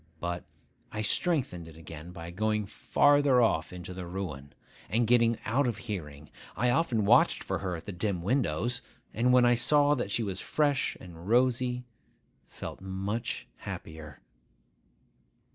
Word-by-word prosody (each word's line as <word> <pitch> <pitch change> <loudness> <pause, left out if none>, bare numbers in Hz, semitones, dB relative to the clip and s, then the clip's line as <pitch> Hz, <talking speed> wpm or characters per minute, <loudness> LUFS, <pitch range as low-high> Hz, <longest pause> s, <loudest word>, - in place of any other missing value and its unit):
But 85 +1 -3 0.5
I 110 0 -3
strengthened 125 - 0
it 80 -1 -13
again 80 +1 -9
by 85 -1 -8
going 105 +3 0
farther 145 +5 +3
off 100 -9 +2
into 90 0 -7
the 90 -1 -6
ruin, 85 -7 -6 0.3
and 115 +2 +2
getting 115 -1 +4
out 130 +4 +2
of 115 -4 -1
hearing. 75 -9 -7 0.3
I 120 +4 +2
often 120 -8 +1
watched - - +5
for - - -2
her 90 -2 -2
at 85 - -9
the 100 - -5
dim 90 -1 -2
windows; 120 - +1 0.3
and, 125 +3 +2
when 125 -1 +6
I 120 - +5
saw 145 +4 +4
that 120 -8 -2
she 115 +3 +1
was 95 -3 -4
fresh 145 -2 +1
and 85 +1 -10
rosy, 125 +1 +2 0.6
felt - - -8
much 95 +5 -3
happier. 75 -3 -8
105 Hz, 150 wpm, -29 LUFS, 85-125 Hz, 0.6 s, when